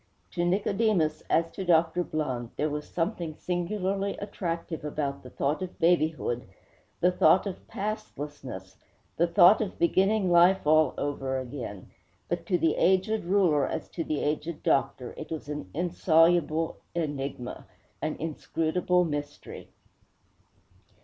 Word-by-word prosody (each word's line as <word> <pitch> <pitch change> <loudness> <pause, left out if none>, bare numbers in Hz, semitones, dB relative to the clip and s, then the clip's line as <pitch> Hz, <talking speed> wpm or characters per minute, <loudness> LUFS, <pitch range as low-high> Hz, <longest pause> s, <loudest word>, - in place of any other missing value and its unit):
To 175 - -1
Nicodemus, 195 -2 +1
as 165 +1 +2
to 195 - -5
Dr. 170 0 +3
Blund, 130 -8 -3
there 150 0 -1
was 150 0 -5
something 170 -2 -2
singularly 195 +3 -2
attractive 170 -5 -4
about 145 -2 -3
the 125 - -11
thought 140 +6 -1
of 185 -1 -6
babyhood, 160 -7 +1 0.5
the 180 - +4
thought 180 +2 +4
of 195 -2 -6
pastlessness, 145 - -6 0.4
the 170 - +3
thought 180 +4 +6
of 205 -3 -3
beginning 190 +2 +2
life 175 +2 +5
all 155 +1 +4
over 135 -2 -2
again. 125 -7 -7 0.4
But - - -3
to 180 - +2
the 165 -2 +1
aged 190 +3 +2
ruler, 175 -7 +3
as - - -4
to 165 - -4
the 155 -2 -2
aged 150 +2 -2
doctor, 130 -2 0
it 155 - -7
was 160 -3 -5
an 150 -10 -5
insoluble 165 - +2 0.2
enigma, 140 -6 -4 0.3
an 155 - -2
inscrutable 165 +3 0
mystery. 145 -2 -6
165 Hz, 130 wpm, -28 LUFS, 150-180 Hz, 0.5 s, thought